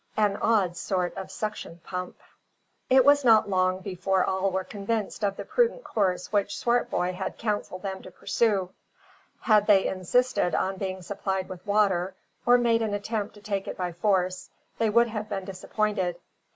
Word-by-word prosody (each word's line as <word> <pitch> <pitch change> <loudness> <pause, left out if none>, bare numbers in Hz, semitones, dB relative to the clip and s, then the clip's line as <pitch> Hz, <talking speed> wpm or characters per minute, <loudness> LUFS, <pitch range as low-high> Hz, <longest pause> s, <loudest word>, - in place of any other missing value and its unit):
AN 210 -2 +3
ODD 200 -6 +2
SORT 180 -1 -2
OF 190 - -6
SUCTION 210 -5 -5
PUMP. 180 -1 -5 0.7
It 260 0 +6
was 285 0 +6
not 225 -4 +6
long 185 -1 +1
before 190 0 0
all 190 +1 0
were 190 0 -1
convinced 210 +2 -3
of 200 -1 +1
the - - -6
prudent - - +1
course 185 -4 -1
which 200 -1 +1
Swartboy 235 -6 0
had 190 +1 -5
counselled 205 -4 -3
them 190 -1 -4
to - - -11
pursue. 195 -1 0 0.7
Had 210 -2 +4
they 200 -3 +5
insisted 190 +2 +1
on 190 0 -1
being 190 -1 -4
supplied 190 0 -3
with 185 -2 -8
water, 195 -3 +2 0.3
or 245 0 +7
made 230 -1 +2
an 215 -2 -1
attempt 210 +1 -3
to 205 - -14
take 200 -2 -3
it - - -5
by 180 -1 -2
force, 185 0 0 0.3
they 225 -1 +2
would 235 +2 +4
have 215 -1 -5
been 195 -2 -3
disappointed. 195 -1 -1
200 Hz, 170 wpm, -27 LUFS, 185-215 Hz, 0.7 s, or